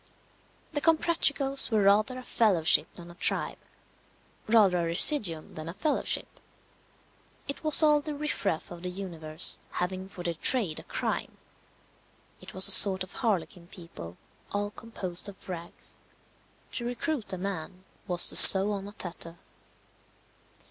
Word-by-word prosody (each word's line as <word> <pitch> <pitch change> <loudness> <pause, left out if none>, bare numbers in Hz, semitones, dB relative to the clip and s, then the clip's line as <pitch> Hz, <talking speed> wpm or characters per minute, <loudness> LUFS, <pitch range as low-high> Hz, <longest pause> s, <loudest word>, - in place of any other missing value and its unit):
The 290 - -4
Comprachicos 295 -4 0
were 215 -3 -1
rather 210 +6 +1
a 255 - -10
fellowship 190 -10 +1
than 175 -1 -13
a - - -15
tribe; 175 - -4 0.9
rather 210 -5 +2
a - - -3
residuum 170 - +2
than 155 +1 -10
a 170 - -10
fellowship. 305 +7 -3 1.1
It 280 - -7
was 310 0 +5
all 300 -1 +2
the 300 0 -8
riffraff 230 - -5
of 175 -1 -11
the 180 - -6
universe, 170 -4 0
having 185 +1 -6
for 180 - -11
their 170 -1 -4
trade 175 -1 -3
a - - -13
crime. - - -6 1.0
It - - -14
was 190 +1 +2
a - - +4
sort 190 0 +5
of 185 - -14
harlequin 180 -6 -4
people, 130 - -13 0.3
all 205 0 -4
composed 200 -5 -6
of 195 - -17
rags. 170 -2 -10 0.7
To 240 - -7
recruit 245 -1 -5
a 185 - -6
man 185 -1 -7 0.2
was 175 -1 +3
to - - -4
sew 195 +2 +11
on 200 -1 -7
a 205 - -12
tatter. 170 -3 -9
195 Hz, 145 wpm, -26 LUFS, 175-235 Hz, 1.1 s, sew